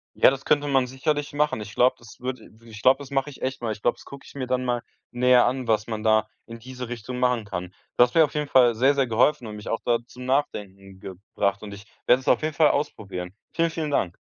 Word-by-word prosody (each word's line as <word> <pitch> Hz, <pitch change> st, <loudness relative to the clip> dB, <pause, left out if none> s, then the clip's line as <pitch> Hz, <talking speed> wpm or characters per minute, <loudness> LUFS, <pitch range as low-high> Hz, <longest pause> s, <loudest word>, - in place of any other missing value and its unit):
Ja, -, -, +6 dB
das 135 Hz, 0 st, -6 dB
könnte 145 Hz, 0 st, +2 dB
man 135 Hz, -2 st, +2 dB
sicherlich 145 Hz, +3 st, -2 dB
machen. 145 Hz, -6 st, 0 dB
Ich 105 Hz, -1 st, -9 dB
glaube, 125 Hz, +1 st, +4 dB
das 115 Hz, -3 st, -15 dB
würd, 130 Hz, 0 st, -4 dB
i -, -, -16 dB
wirklich 110 Hz, 0 st, -15 dB
ich -, -, -10 dB
glaub, 130 Hz, +4 st, +5 dB
das 140 Hz, 0 st, -11 dB
mach 135 Hz, 0 st, 0 dB
ich 145 Hz, -, -11 dB
echt 130 Hz, -1 st, -3 dB
mal. 115 Hz, -, -2 dB
Ich 110 Hz, -, -7 dB
glaub, 120 Hz, -, +1 dB
das -, -, -17 dB
guck 140 Hz, 0 st, -11 dB
ich -, -, -14 dB
mir 130 Hz, -2 st, -4 dB
dann 130 Hz, 0 st, -1 dB
mal 120 Hz, -1 st, 0 dB, 0.3 s
näher 125 Hz, 0 st, +4 dB
an, 125 Hz, 0 st, -2 dB
was 110 Hz, 0 st, +1 dB
man 110 Hz, -1 st, -4 dB
da 110 Hz, -1 st, +3 dB, 0.2 s
in 115 Hz, 0 st, -10 dB
diese 125 Hz, 0 st, -8 dB
Richtung 120 Hz, +1 st, -6 dB
machen 125 Hz, -3 st, +1 dB
kann. 90 Hz, -2 st, -6 dB, 0.2 s
Du -, -, +8 dB
hast 125 Hz, -, -1 dB
mir 165 Hz, -, +7 dB
auf 145 Hz, -, -1 dB
jeden 150 Hz, -1 st, -2 dB
Fall 125 Hz, -4 st, +5 dB
sehr 135 Hz, +5 st, +3 dB
sehr 135 Hz, -2 st, +1 dB
geholfen 120 Hz, +3 st, +2 dB
und 105 Hz, -, -7 dB
mich 105 Hz, -, -8 dB
auch 115 Hz, -, -1 dB
da 120 Hz, -1 st, +2 dB
zum 125 Hz, +1 st, -11 dB
Nachdenken 100 Hz, -8 st, -3 dB
gebracht 100 Hz, +1 st, -3 dB
und 100 Hz, -1 st, -8 dB
ich 100 Hz, +2 st, -11 dB, 0.2 s
werde 125 Hz, -, +6 dB
es -, -, -16 dB
auf 120 Hz, -, +4 dB
jeden 155 Hz, 0 st, -2 dB
Fall 155 Hz, -2 st, +5 dB
ausprobieren. 95 Hz, -10 st, -3 dB, 0.2 s
Vielen, 165 Hz, 0 st, +1 dB
vielen 160 Hz, -2 st, -4 dB
Dank. 90 Hz, -10 st, 0 dB
125 Hz, 270 wpm, -24 LUFS, 110-135 Hz, 0.3 s, Du